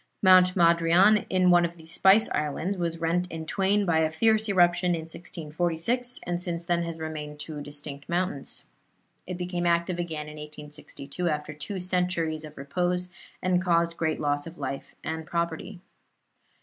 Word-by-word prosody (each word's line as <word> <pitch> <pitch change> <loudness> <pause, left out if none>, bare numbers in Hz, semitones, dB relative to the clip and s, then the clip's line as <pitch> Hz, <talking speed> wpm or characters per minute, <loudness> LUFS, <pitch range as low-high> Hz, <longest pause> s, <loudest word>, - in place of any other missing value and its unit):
Mount 185 -1 +7
Madrian 170 +4 +5
in 185 -1 +4
one 175 0 +6
of 170 0 -3
the 160 - -14
Spice 190 +6 +5
Islands, 150 +6 -1
was 170 -2 -2
rent 170 +2 0
in 160 -1 -6
twain 200 +4 +1
by 165 -3 +2
a 160 -1 +2
fierce 220 +6 +2
eruption 175 -1 +3
in 165 - -4
1646, 170 +8 -2
and 175 0 -2
since 170 -1 -3
then 170 -1 +1
has 170 -1 -4
remained 155 -2 -6
two 150 0 -6
distinct 145 0 -8
mountains. 175 -5 -2 0.6
It 180 -1 -4
became 175 -1 -2
active 170 +1 +1
again 160 -3 -4
in 150 0 -9
1862, 150 +1 -6
after 150 -1 -3
two 155 +6 -6
centuries 180 -3 -1
of 155 -1 -11
repose, 180 +6 -1 0.3
and 180 -1 +2
caused 170 -2 +2
great 160 -2 -1
loss 145 0 -1
of 165 - -10
life 135 -1 -5
and 160 +1 -3
property. 170 +3 -3
170 Hz, 160 wpm, -27 LUFS, 155-180 Hz, 0.6 s, Mount